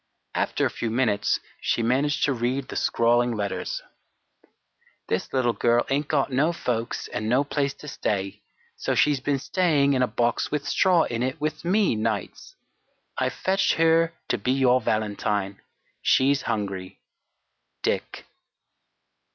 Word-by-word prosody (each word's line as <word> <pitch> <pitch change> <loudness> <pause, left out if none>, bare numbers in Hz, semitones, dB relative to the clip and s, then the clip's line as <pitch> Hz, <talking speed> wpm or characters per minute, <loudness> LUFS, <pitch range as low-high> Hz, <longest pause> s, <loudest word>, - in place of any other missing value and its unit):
After - - 0
a - - 0
few 115 - -3
minutes 110 -4 +1 0.2
she 115 - 0
managed 135 +5 +1
to 135 - +3
read 130 +2 -2
the - - -6
scrawling 120 0 +2
letters: 100 -2 -3 1.3
"This - - -1
little 125 -3 +1
girl 120 +1 +2
ain't 140 +1 0
got 140 -2 +1
no 145 +6 +2
folks 120 -8 -3
and 110 +1 -3
no 130 +4 +3
place 140 -1 -1
to 150 - -12
stay; 100 -8 -3 0.3
so - - -2
she's 145 -2 +3
been 140 +2 0
staying 145 -2 +2
in 130 - +1
a 125 - +3
box 120 -1 0
with 150 -1 -3
straw 180 -3 +4
in 115 -1 -3
it 130 +5 -2
with 155 +1 -3
me 195 - +2
nights. 110 - -3 0.6
I've - - 0
fetched 190 +1 +1
her 165 0 +3
to - - 0
be 130 - +1
your 130 -1 +3
valentine. 105 -2 -1 0.4
She's 140 +2 +3
hungry. 95 -3 -3 0.8
"DICK." - - -2
130 Hz, 145 wpm, -25 LUFS, 115-145 Hz, 1.3 s, straw